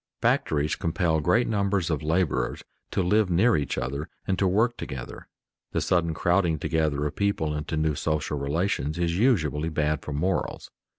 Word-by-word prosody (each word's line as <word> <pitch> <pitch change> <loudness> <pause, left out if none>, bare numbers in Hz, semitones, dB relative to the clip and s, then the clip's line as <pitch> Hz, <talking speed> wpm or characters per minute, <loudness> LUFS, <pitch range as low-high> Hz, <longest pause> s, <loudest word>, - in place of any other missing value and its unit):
Factories 75 0 +1
compel 80 -1 0
great 90 +10 +2
numbers 100 -5 0
of 75 - -1
laborers 80 -6 0 0.3
to 95 - 0
live 105 +2 +3
near 105 +7 +4
each 70 -2 -1
other 70 +4 -3 0.2
and 95 -2 -1
to 95 - +3
work 110 +6 +2
together. 65 -4 -7 0.5
The - - +1
sudden 85 -2 +1
crowding 85 -1 +2
together 75 -2 0
of 75 - -3
people 100 -7 0
into 75 +1 -3
new 75 0 +1
social 75 0 -1
relations 75 +1 -1
is 85 +1 0
usually 80 - +2
bad 75 -2 0
for - - -7
morals. 90 +6 -2
80 Hz, 165 wpm, -26 LUFS, 75-95 Hz, 0.5 s, near